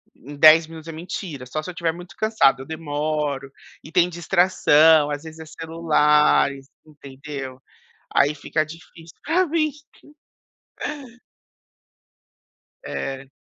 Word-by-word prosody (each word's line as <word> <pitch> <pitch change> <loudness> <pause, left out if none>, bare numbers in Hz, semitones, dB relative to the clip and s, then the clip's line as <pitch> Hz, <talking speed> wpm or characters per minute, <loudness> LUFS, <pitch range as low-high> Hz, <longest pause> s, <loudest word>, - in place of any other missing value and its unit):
em 145 +3 -12
10 160 +1 +7
minutos." 160 0 -11
É - - -5
mentira. 160 -4 -7
Só 155 +5 -4
se 180 - -7
eu 180 - -6
estiver 170 -1 -1
muito 175 -2 -12
cansado. 215 -12 +2
Eu - - -9
demoro. 150 -2 -3 0.3
E 155 - -12
tem 175 0 +3
distração. 160 -3 +4
Às 145 +1 -4
vezes 160 0 -11
é 160 - -9
celulares, 150 -4 +2 0.2
entendeu. 140 -2 -9 0.5
Aí 145 - +3
fica 155 +2 -2
difícil. 165 +1 -14
É 350 +4 +3
o 335 - -5
vício. 305 -2 -1 3.0
É. 135 0 -5
155 Hz, 125 wpm, -22 LUFS, 145-170 Hz, 3.0 s, 10